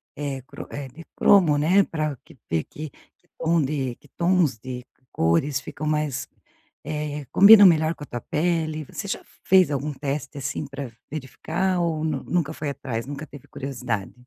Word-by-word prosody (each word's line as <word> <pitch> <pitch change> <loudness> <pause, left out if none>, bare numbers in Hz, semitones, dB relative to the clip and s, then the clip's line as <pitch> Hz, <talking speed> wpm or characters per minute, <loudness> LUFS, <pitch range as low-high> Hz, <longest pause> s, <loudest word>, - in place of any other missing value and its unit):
eh, 140 -2 -4
cro - - -9
eh, 140 -1 -5
de 165 +6 -12
cromo, 175 -8 +5
né, 180 +7 +4
pra 155 -4 -2
que - - -17
ter 80 -1 0
que 155 0 -7 0.3
que 175 - -36
tom 165 0 +2
de 135 -3 -1
que 145 - -22
tons 170 -7 +2
de 125 +1 -7 0.3
cores 105 - +2
ficam 155 +2 -6
mais, 150 -3 -1 0.6
eh, 150 -1 -3
combinam 205 +1 +9
melhor 160 -1 +3
com 150 - -10
a - - -9
tua 120 - -5
pele. 155 -2 -1
Você 200 - -6
já - - -3 0.2
fez 185 -4 +5
algum 145 +1 -2
teste 145 +1 -4
assim 140 +2 -3
pra 135 -3 -6 0.2
verificar 175 +6 -2
ou 160 -2 0
nu 150 -4 -1
nunca 160 -3 -1
foi 150 -2 -4
atrás, 120 -4 -4
nunca 145 +2 -6
teve 145 -1 -13
curiosidade? 125 -7 -4
150 Hz, 175 wpm, -24 LUFS, 135-160 Hz, 0.6 s, combinam